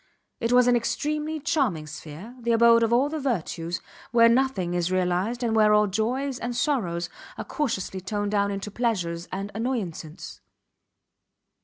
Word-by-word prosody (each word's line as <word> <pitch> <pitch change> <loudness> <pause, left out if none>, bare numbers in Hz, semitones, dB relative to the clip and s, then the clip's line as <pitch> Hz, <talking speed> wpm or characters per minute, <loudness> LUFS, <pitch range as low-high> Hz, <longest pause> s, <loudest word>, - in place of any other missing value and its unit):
It 230 - -1
was 250 0 +6
an 245 - +5
extremely 300 +6 -1
charming 265 - 0
sphere, 155 +9 -9
the 235 0 +1
abode 230 0 +6
of 230 0 +2
all 250 +4 +4
the 310 +1 -3
virtues, 175 - -2 0.3
where 230 0 +6
nothing 235 -8 +1
is 175 0 0
realized 185 +6 0
and 225 -2 +1
where 210 -1 +5
all 210 0 +5
joys 245 +7 -1
and 240 +1 -3
sorrows 190 - 0 0.3
are - - -5
cautiously 195 - -2
toned 205 +2 -2
down 200 -1 +2
into 200 +1 -4
pleasures 180 -8 -1
and 195 +2 -4
annoyances. 200 -9 -4
220 Hz, 155 wpm, -26 LUFS, 185-245 Hz, 0.3 s, was